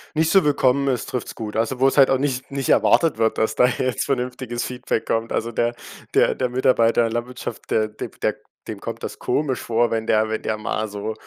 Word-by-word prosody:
Nicht 160 +1 +2
zu 195 -2 +5
willkommen 140 -1 +2
ist, 125 -3 -1
trifft's 125 - -4
gut. 110 -2 -6
Also 115 +3 -1
wo's 135 +2 +3
halt 135 - +7
auch 135 - +3
nicht 130 -2 -2
nicht 135 -1 -3
erwartet 165 -8 +4
wird, 110 0 +1
dass 110 - +1
da 125 - +5
jetzt 130 0 -1
vernünftiges 125 -2 -2
Feedback 125 -2 -3
kommt. 115 0 -1
Also 115 +1 -1
der 120 +1 0 0.4
der - - +4
der 125 -1 -1
Mitarbeiter 120 -2 +3
in 115 - +3
der 115 - -3
Landwirtschaft, 120 +1 -5
der 110 -1 +1
de 105 - -6
b - - -22
der - - +1 0.3
dem - - -6
kommt - - -6
das - - -6
komisch 140 -4 -1
vor, 115 +1 +1
wenn 115 -1 -2
der 110 0 +2
wenn 110 - -2
der 110 - -2
mal 110 0 -2
so 105 +2 -5
120 Hz, 230 wpm, -22 LUFS, 110-130 Hz, 0.4 s, halt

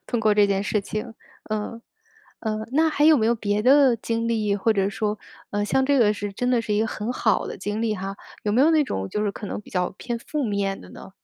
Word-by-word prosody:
通 240 - -1
过 220 -1 +3
这 205 -1 +5
件 195 -1 0
事 210 +1 0
情。 215 +4 -5 0.4
呃， 215 +2 -3 0.6
呃， 215 -1 -3
那 320 +3 +4
还 295 -1 +1
有 310 -2 +7
没 220 - +2
有 235 - +3
别 210 -2 -1
的 265 +2 +5
经 230 0 -2
历， 215 -3 +1
或 220 +3 +2
者 195 -2 +1
说， 210 +1 -2 0.3
呃， 205 0 -1
像 265 +5 +2
这 280 +1 +3
个 215 -3 +4
是 205 -1 -5
真 245 +5 -2
的 240 -2 +2
是 215 - -2
一 210 - +2
个 225 - +1
很 215 +2 -3
好 - - +1
的 - - -6
经 210 +2 -3
历 220 -2 0
哈， 195 0 -5 0.3
有 205 - +1
没 235 - +3
有 310 - +5
那 315 -2 +4
种， 95 - -3
就 210 - -1
是 210 - 0
可 205 - -8
能 - - -4
比 - - -18
较 180 -1 -1
偏 240 -1 -4
负 300 +5 -3
面 200 -3 -1
的 - - -13
呢？ - - -11
215 Hz, 280 characters per minute, -24 LUFS, 205-240 Hz, 0.6 s, 有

